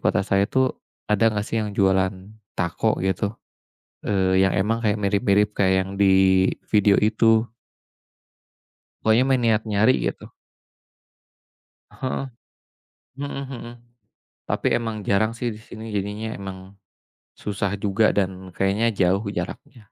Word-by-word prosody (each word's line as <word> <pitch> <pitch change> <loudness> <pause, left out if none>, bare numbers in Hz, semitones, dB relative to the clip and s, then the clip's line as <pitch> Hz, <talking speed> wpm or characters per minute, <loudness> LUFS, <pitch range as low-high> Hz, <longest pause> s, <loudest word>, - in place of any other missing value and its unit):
kota 105 -3 +2
saya 100 0 +1
tuh 130 -1 +1 0.3
ada 105 +2 +3
gak 105 - -1
sih 115 +1 -2
yang 105 -2 -4
jualan 95 -1 +3 0.4
taco 85 -1 0
gitu? 100 +3 -1 0.7
Eee, 95 -2 +2
yang 95 -1 +3
emang 110 +5 +1
kayak 105 -2 +1
mirip-mirip 100 +1 +2
kayak 95 -2 +2
yang 95 - -9
di 100 - +5 0.6
video 105 -1 +5
itu. 110 +1 +3 1.6
Pokoknya 110 +3 +4
mah 135 -1 +2
niat 110 -2 +2
nyari 110 +3 +3
gitu. - - -4 1.6
Heeh, 130 +1 -4 0.9
mhm 145 - -3 0.2
mhm, 120 -1 -8 0.7
tapi - - -1
emang 115 -2 -3
jarang 110 +3 +2
sih 120 +1 -3
di 110 - -5
sini 110 -1 -9
jadinya 105 +3 -3
emang, 95 -1 -7 0.8
susah 100 -1 -2
juga 105 +2 +2
dan 95 -1 -2
kayaknya 100 +4 +1
jauh 95 +3 +2
jaraknya. 120 - -6
105 Hz, 125 wpm, -23 LUFS, 95-115 Hz, 1.6 s, di